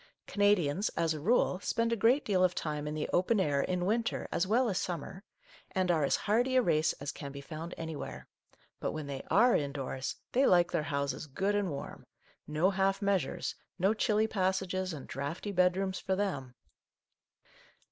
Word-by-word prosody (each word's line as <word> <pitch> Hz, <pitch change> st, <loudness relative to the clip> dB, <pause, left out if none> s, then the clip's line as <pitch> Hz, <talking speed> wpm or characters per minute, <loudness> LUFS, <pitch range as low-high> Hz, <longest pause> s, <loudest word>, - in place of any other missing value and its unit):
Cana 205 Hz, 0 st, +4 dB
dians, 175 Hz, +2 st, -1 dB
as 165 Hz, -1 st, +2 dB
a 155 Hz, -, -5 dB
rule, 185 Hz, +1 st, +2 dB
spend 230 Hz, +3 st, 0 dB
a -, -, +2 dB
great 235 Hz, +6 st, +3 dB
deal 185 Hz, -3 st, +2 dB
of 180 Hz, -1 st, +2 dB
time 150 Hz, -1 st, -3 dB
in 150 Hz, -, -3 dB
the 155 Hz, -, -2 dB
open 195 Hz, +5 st, +3 dB
air 145 Hz, -6 st, +2 dB
in 180 Hz, +2 st, -1 dB
winter 225 Hz, +4 st, 0 dB
as 180 Hz, -, 0 dB
well 240 Hz, +5 st, +3 dB
as 195 Hz, -5 st, 0 dB
summer, 180 Hz, +3 st, -5 dB, 0.5 s
and 185 Hz, -2 st, +2 dB
are 160 Hz, -3 st, +2 dB
as 140 Hz, -, +3 dB
hardy 245 Hz, +5 st, +1 dB
a 255 Hz, -, +6 dB
race 160 Hz, -4 st, +2 dB
as 140 Hz, +1 st, -5 dB
can 140 Hz, -1 st, -7 dB
be 140 Hz, -, -8 dB
found 155 Hz, +4 st, -7 dB
anywhere, 160 Hz, -2 st, -6 dB, 0.5 s
but -, -, -2 dB
when 155 Hz, -1 st, -4 dB
they 140 Hz, -1 st, -5 dB
are 240 Hz, +4 st, +5 dB
indoors 140 Hz, -2 st, -2 dB, 0.2 s
they 265 Hz, +2 st, +4 dB
like 175 Hz, -1 st, +4 dB
their -, -, +1 dB
houses 140 Hz, 0 st, -2 dB
good 195 Hz, +9 st, -1 dB
and 205 Hz, -2 st, 0 dB
warm, 140 Hz, -3 st, -7 dB, 0.2 s
— -, -, -36 dB
no 185 Hz, +5 st, +4 dB
half 195 Hz, 0 st, +1 dB
measures, 195 Hz, -3 st, 0 dB, 0.2 s
no 190 Hz, +3 st, +3 dB
chilly 215 Hz, 0 st, +2 dB
passages 190 Hz, -2 st, -1 dB
and 145 Hz, -5 st, -7 dB
draughty 145 Hz, +9 st, -4 dB
bedrooms 185 Hz, +1 st, +1 dB
for 190 Hz, -, -1 dB
them 155 Hz, -11 st, -3 dB
185 Hz, 190 wpm, -31 LUFS, 150-205 Hz, 0.5 s, a